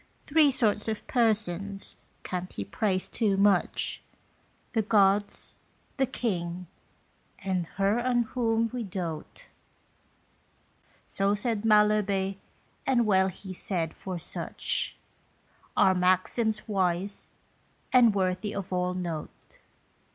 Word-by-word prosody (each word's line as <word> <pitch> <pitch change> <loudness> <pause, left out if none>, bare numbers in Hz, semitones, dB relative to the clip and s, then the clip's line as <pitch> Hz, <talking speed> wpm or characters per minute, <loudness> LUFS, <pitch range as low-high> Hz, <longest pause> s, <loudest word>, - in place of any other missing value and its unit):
Three 305 0 +4
sorts 220 -6 +1
of 220 -1 -3
persons 200 -5 0 0.3
can't 180 0 -4
he 100 - -5
praised 185 - -1
too 205 -4 +1
much: 200 -2 +2 0.7
The 225 - +3
Gods, 205 -1 +2 0.4
the 265 -1 +2
King, 180 -8 -3 0.7
and 185 -4 -2
her 200 +3 +2
on 240 -1 +2
whom 230 -1 0
we 250 - -2
doat. 180 - -6 1.6
So 200 +1 +1
said 215 0 -1
Malherbe, 210 -3 +3 0.5
and 245 -3 +3
well 190 -2 +4
he 190 +1 -7
said, 175 -3 -2
for 185 -2 -5
such 170 - -2 0.8
Are 190 - +6
maxims 185 +5 +1
wise, 190 -1 -1 0.6
and 235 -5 +6
worthy 185 +1 -1
of 195 -1 -4
all 180 0 0
note. 170 -4 -6
200 Hz, 105 wpm, -28 LUFS, 185-220 Hz, 1.6 s, Are